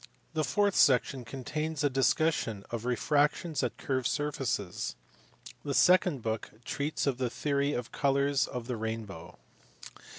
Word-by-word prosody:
The 155 -1 0
fourth 200 +8 +1
section 130 -1 +4
contains 150 +5 -4
a - - +5
discussion 135 -5 +1
of 115 -1 -4
refractions 145 +5 +1
at 125 -3 -2
curved 130 -3 -1
surfaces. 135 - -2 0.7
The 140 -2 -2
second 180 -8 +4
book 110 0 -2 0.2
treats 145 +4 -2
of 135 -3 0
his 125 -2 -1
theory 140 +1 0
of 120 -1 -4
colours 140 -1 +2
and - - -10
of 120 -2 -3
the 125 -1 -3
rainbow. 110 -6 -5
135 Hz, 140 wpm, -30 LUFS, 120-150 Hz, 0.7 s, a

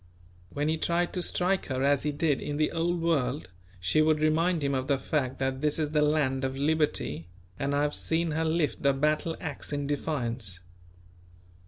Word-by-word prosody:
When 145 +9 -2
he 160 +1 +1
tried 175 +1 0
to 180 - -2
strike 180 +2 0
her 130 -1 -1
as 140 0 +3
he 150 - 0
did 145 -1 0
in 145 0 -3
the 155 0 +1
Old 170 +1 0
World 140 - 0 0.3
she 95 +13 +2
would 155 0 +3
remind 160 +2 +2
him 140 0 +1
of 130 0 -1
the 140 -2 +2
fact 135 -1 -1
that 130 0 -1
this 150 -1 +1
is 155 -2 -1
the 150 -1 +2
land 145 -3 +2
of 135 0 -2
liberty, 140 - 0 0.3
and 140 +1 0
I 145 - +2
have 150 0 0
seen 165 0 0
her 160 +2 0
lift 160 -1 0
the 140 0 +3
battle 155 +3 0
axe 150 -2 -5
in 145 -1 -2
defiance. 120 - -2
150 Hz, 195 wpm, -28 LUFS, 135-160 Hz, 0.3 s, as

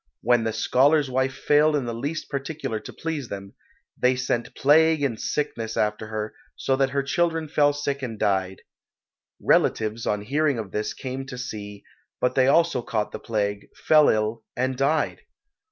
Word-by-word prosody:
When 120 -1 +3
the 110 - 0
scholar's 135 +6 +3
wife 130 +1 0
failed 150 +2 +3
in 140 -4 0
the 120 - -3
least 145 +7 -4
particular 140 -5 -4
to - - -10
please 155 -7 -4
them, 100 -1 -7 0.4
they 125 +1 +2
sent 125 -2 -2
plague 155 +1 +4
and 120 -6 -1
sickness 115 -7 -2
after 105 0 0
her, 110 0 -4 0.2
so 135 - 0
that 135 -1 +2
her 140 0 -1
children 165 +2 0
fell 145 -1 +3
sick 145 -1 -3
and 115 -4 -5
died. 95 -2 0 0.8
Relatives 110 +1 +1
on 105 -1 0
hearing 145 +3 +1
of 105 -4 -5
this 105 0 -3
came 135 +1 -5
to 130 -2 -7
see, 105 -5 -7 0.4
but 125 0 +1
they 130 0 +3
also 165 -2 +3
caught 110 -3 -2
the - - -6
plague, 100 -3 -2
fell 155 -2 +5
ill 110 +1 0
and 130 +1 0
died. 140 +4 0
130 Hz, 170 wpm, -24 LUFS, 110-145 Hz, 0.8 s, fell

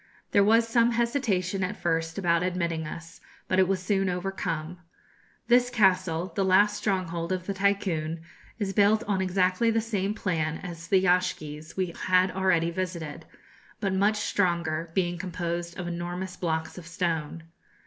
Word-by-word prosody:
There 200 - +5
was 225 +3 +4
some 235 +1 +3
hesitation 225 -6 0
at 185 +3 -3
first 165 -1 -1
about 170 -3 +2
admitting 170 -3 -1
us; 165 +2 -9 0.3
but 185 - +2
it 185 - +5
was 195 0 0
soon 195 0 0
overcome. 180 -2 -3 0.7
This 245 0 +4
castle, 185 -6 +2
the 195 - +1
last 200 +2 +4
stronghold 180 -4 -2
of 185 -1 -2
the 200 - -2
Tycoon, 185 -5 0 0.4
is 200 -3 -2
built 210 +2 +4
on 200 -4 0
exactly 185 +3 +2
the 225 0 +2
same 210 -2 -2
plan 160 -6 -1
as 165 -2 -7
the 190 - +4
yashgis 160 -4 -1
we 185 -3 -1
had 185 0 +4
already 180 -3 +1
visited, 170 -4 -5 0.5
but 195 -3 -1
much 205 +3 +2
stronger, 170 -5 0
being 175 -2 0
composed 170 -1 -4
of 180 -2 -4
enormous 175 +2 -4
blocks 160 0 -3
of 165 - -12
stone. 165 -2 -2
185 Hz, 155 wpm, -27 LUFS, 170-195 Hz, 0.7 s, There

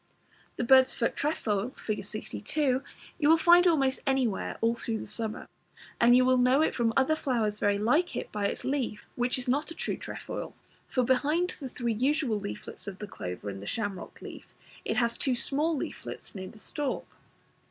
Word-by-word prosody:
The - - -2
Bird's 260 +1 +6
foot 230 - 0
trefoil, 240 -6 -1
Fig. 210 -2 -3
62, 255 +6 -1 0.4
you 295 -2 +3
will 325 - +7
find 350 +2 +6
almost 275 -6 +3
anywhere 260 -7 0
all 230 +1 +2
through 230 -1 -3
the - - -6
summer, 215 +1 -4 0.5
and 240 +1 +7
you 255 - +5
will 255 0 +4
know 255 +4 +4
it - - +1
from 235 -2 +1
other 270 +4 +4
flowers 225 -8 0
very 205 0 +2
like 300 - +2
it - - -4
by 205 -1 0
its - - -4
leaf, 260 -6 -2
which 245 +1 +1
is 255 - -4
not 285 +5 +1
a 330 - -8
true - - -2
trefoil, - - -6 0.3
for 255 - +1
behind 295 +8 +2
the 270 -4 -7
three 235 -2 -2
usual 260 -1 +1
leaflets 200 +1 -7
of 195 -2 -5
the 210 - -6
clover 90 - -6
and 100 -1 -5
the 100 - -8
shamrock 205 -4 -4
leaf, - - -10 0.3
it - - -1
has 235 -1 +1
two 260 -3 +1
small 300 +6 +1
leaflets - - -6
near 190 -2 -6
the 220 - -13
stalk. 285 +5 -3
250 Hz, 190 wpm, -29 LUFS, 215-280 Hz, 0.5 s, will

